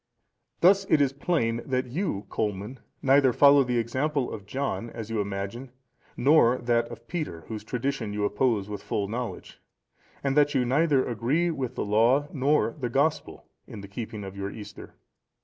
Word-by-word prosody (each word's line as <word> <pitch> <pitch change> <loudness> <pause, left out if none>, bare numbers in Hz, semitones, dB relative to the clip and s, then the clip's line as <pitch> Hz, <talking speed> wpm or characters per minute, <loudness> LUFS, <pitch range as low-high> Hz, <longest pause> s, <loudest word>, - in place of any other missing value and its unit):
(473) 175 - +7
"Thus 195 0 +3
it - - +2
is 135 -1 0
plain, 120 -10 +1
that 130 -1 -1
you, 135 - -3
Colman, 105 +3 -3 0.2
neither 135 -1 +5
follow 140 +2 +6
the 125 -1 -1
example 130 +4 -1
of 100 -2 -8
John, 130 -1 -3
as 115 -1 -7
you 110 -2 0
imagine, 100 +6 -5 0.5
nor 130 -3 +5
that 120 -1 +1
of 115 0 -11
Peter, 150 - -4
whose 105 +5 -7
tradition 125 -1 -3
you 105 0 -1
oppose 105 -1 +1
with 105 -1 -6
full 100 -1 -2
knowledge, 120 +3 -6 0.6
and 135 -1 0
that 145 -1 +3
you 125 - +2
neither 140 +1 +2
agree 130 +10 0
with 130 -5 -4
the - - -2
Law 115 +8 +3
nor 140 -3 +2
the 125 -3 -2
Gospel 140 +6 -1 0.2
in 105 - -9
the 100 - -9
keeping 110 +1 -6
of 95 0 -8
your 100 0 -4
Easter. 105 0 -10
120 Hz, 175 wpm, -27 LUFS, 110-140 Hz, 0.6 s, 473